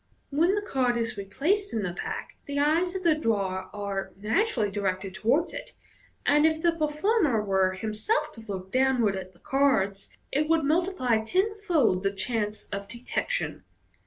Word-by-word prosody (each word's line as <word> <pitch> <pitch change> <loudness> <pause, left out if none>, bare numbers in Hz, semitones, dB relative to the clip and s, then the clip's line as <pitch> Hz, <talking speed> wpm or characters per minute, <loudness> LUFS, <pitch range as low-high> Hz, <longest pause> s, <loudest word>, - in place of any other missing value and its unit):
When 335 +7 +3
the 415 - -1
card 255 -9 +1
is 230 -1 -2
replaced 315 - -1
in 220 - 0
the 180 -2 -2
pack, - - -5
the 285 0 -3
eyes 325 +6 +2
of 375 - -3
the 335 -2 +5
drawer 195 -9 -1
are 200 -2 -4
naturally 220 - +1
directed 190 -1 -2
towards 250 - +1
it; - - -8 0.5
and 295 +1 +4
if 315 0 +3
the 340 +1 +3
performer 310 - +1
were 190 -2 +2
himself 215 - -1
to 225 - -12
look 190 -3 -6
downward 255 -6 +3
at 185 -1 -7
the 175 - -24
cards, 220 -8 +1 0.2
it 300 +3 +1
would 325 -1 +3
multiply 295 - +1
tenfold 365 - +1
the 195 0 +1
chances 210 +1 -2
of 200 0 -4
detection. 250 - -3
245 Hz, 160 wpm, -27 LUFS, 200-320 Hz, 0.5 s, the